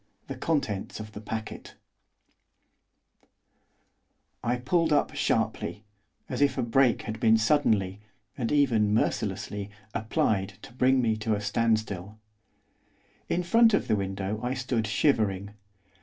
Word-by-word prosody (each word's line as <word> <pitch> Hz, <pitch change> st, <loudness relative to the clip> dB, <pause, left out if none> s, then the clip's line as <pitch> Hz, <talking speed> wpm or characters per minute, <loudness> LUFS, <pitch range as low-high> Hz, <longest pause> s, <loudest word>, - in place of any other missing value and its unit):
THE -, -, -5 dB
CONTENTS 110 Hz, -14 st, -2 dB
OF 110 Hz, 0 st, -8 dB
THE 105 Hz, -, -9 dB
PACKET 110 Hz, +1 st, -6 dB, 2.7 s
I 120 Hz, +1 st, +1 dB
pulled 160 Hz, +6 st, +1 dB
up 150 Hz, +1 st, +2 dB
sharply, 110 Hz, -5 st, -1 dB, 0.4 s
as -, -, -4 dB
if 140 Hz, -2 st, +3 dB
a -, -, +1 dB
brake 120 Hz, +1 st, +3 dB
had 110 Hz, 0 st, -5 dB
been 110 Hz, 0 st, +5 dB
suddenly, 110 Hz, -6 st, +2 dB, 0.4 s
and 115 Hz, -3 st, -2 dB
even 115 Hz, -8 st, +3 dB
mercilessly, 100 Hz, -1 st, -1 dB, 0.2 s
applied 110 Hz, -3 st, 0 dB
to -, -, -11 dB
bring 130 Hz, +1 st, +3 dB
me 110 Hz, -2 st, +1 dB
to 110 Hz, 0 st, 0 dB
a -, -, -3 dB
standstill. 110 Hz, -2 st, -1 dB, 1.1 s
In 180 Hz, -, 0 dB
front 225 Hz, +4 st, +5 dB
of -, -, -1 dB
the 110 Hz, -, +2 dB
window 95 Hz, +1 st, -3 dB
I 125 Hz, +2 st, -2 dB
stood 125 Hz, -4 st, -1 dB
shivering. 105 Hz, -4 st, +1 dB
110 Hz, 125 wpm, -27 LUFS, 105-130 Hz, 2.7 s, been